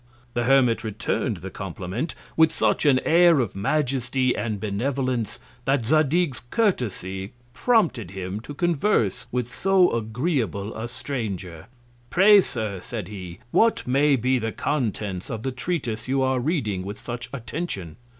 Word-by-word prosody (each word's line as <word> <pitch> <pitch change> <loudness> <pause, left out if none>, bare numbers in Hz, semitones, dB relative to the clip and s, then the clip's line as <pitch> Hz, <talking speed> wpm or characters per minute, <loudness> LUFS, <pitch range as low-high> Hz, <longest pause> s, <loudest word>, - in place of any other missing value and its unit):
The 120 -1 0
Hermit 125 -3 +4
return'd 110 +1 -2
the 95 +3 -8
Compliment 95 - -4 0.2
with 160 -1 +5
such 160 - +1
an 130 -3 +5
Air 170 -2 +6
of 115 -7 -1
Majesty 130 +2 +1
and 110 -3 -2
Benevolence, 125 +3 -1 0.3
that 135 -3 +1
Zadig's 155 +1 +2
Curiosity 105 - -1 0.2
prompted 170 - +2
him 95 +1 -5
to 145 +6 -9
converse 170 - +1
with 125 0 -2
so 190 +2 +4
agreeable 110 - -1
a 110 +2 -4
Stranger. 100 - -5 0.4
Pray, 200 +2 +7
Sir, 105 - -4
said 105 -1 -6
he, 90 -4 -8
what 230 0 +3
may 140 +3 +4
be 130 +1 +1
the 110 -1 -2
Contents 105 -10 -2
of 110 -1 -4
the 130 - -1
Treatise 125 -5 -3
you 135 +1 +1
are 130 -1 +1
reading 120 - -1
with 100 +3 -6
such 120 0 -5
Attention. 115 - -4
125 Hz, 140 wpm, -24 LUFS, 105-145 Hz, 0.4 s, Pray